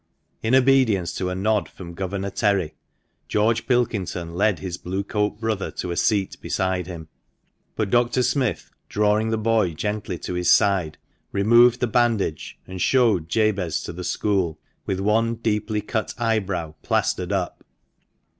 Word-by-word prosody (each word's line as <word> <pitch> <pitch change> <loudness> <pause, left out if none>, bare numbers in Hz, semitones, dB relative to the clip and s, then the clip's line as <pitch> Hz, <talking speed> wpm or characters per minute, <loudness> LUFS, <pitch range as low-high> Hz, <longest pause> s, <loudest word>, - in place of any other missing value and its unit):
In 115 +3 +2
obedience 125 -10 +3
to 90 0 -1
a 90 - -3
nod 105 -3 0
from 85 -2 -10
Governor 95 +2 -3
Terry, 100 -8 +1 0.5
George 110 +2 +1
Pilkington 95 -9 -1
led 100 +1 +2
his 85 +3 -5
Blue 95 +2 -3
coat 105 0 -1
brother 110 -3 -2
to 90 - -4
a - - -2
seat 100 -1 +1
beside 95 -2 -1
him; 85 -3 -8 0.7
but 105 -3 -2
Dr. 120 +1 +3
Smith, 125 - -1 0.2
drawing 105 +1 +2
the 110 - 0
boy 110 -5 +1
gently 105 0 -3
to 90 - -5
his 90 0 0
side, 95 -6 +3 0.3
removed 120 +4 +5
the - - +3
bandage, 115 -8 0
and 95 -1 -7
showed 110 -11 +3
Jabez 100 -5 0
to - - -6
the 90 +2 -7
school 95 -5 0 0.3
with 95 - -1
one 110 +3 +1
deeply 110 -1 -1
cut 110 +1 -3
eyebrow 100 -9 -1
plaistered 90 +1 0
up. 95 -3 -2
105 Hz, 150 wpm, -23 LUFS, 90-110 Hz, 0.7 s, removed